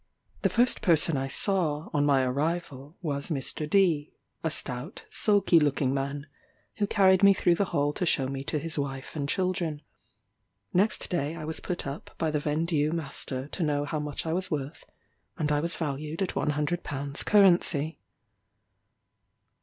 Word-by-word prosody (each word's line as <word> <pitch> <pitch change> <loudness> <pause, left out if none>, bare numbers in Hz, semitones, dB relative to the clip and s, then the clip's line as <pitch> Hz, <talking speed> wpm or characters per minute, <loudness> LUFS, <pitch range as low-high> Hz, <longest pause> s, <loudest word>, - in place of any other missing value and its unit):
The - - +2
first 245 +2 +2
person 165 -3 +3
I 135 0 -1
saw, 160 -2 0
on 145 -1 +2
my 135 -2 +4
arrival, 145 +2 -2
was 140 -2 0
Mr. 150 0 -2
D, 165 -6 +2 0.3
a 160 - +1
stout 135 - -2
sulky 200 -5 +4
looking 140 -3 +1
man, 140 +1 -3 0.5
who 205 - +1
carried 190 -3 +4
me 200 -1 +7
through 175 - +3
the 195 +4 +1
hall 145 -4 0
to 180 - -2
show 135 -4 +2
me 135 0 -4
to 150 - -1
his 155 +1 -3
wife 135 0 -5
and 145 -2 -3
children. 175 -5 -1 0.9
Next 200 +5 +2
day 160 -2 -1
I 155 -2 -6
was 160 +1 -2
put 180 - -4
up 140 +2 -7
by 160 -2 0
the 150 - 0
vendue 155 0 0
master 140 -4 -4
to 185 - -6
know 145 -2 0
how 150 +1 -2
much 150 +1 -3
I 160 - -1
was 185 +1 -1
worth, 145 -2 -4 0.5
and 150 -2 -1
I 145 - +2
was 170 +3 -1
valued 155 +2 -3
at 185 - -3
one - - 0
hundred 150 +4 -1
pounds 140 +1 -3
currency. 175 -6 +4
150 Hz, 170 wpm, -28 LUFS, 145-175 Hz, 0.9 s, me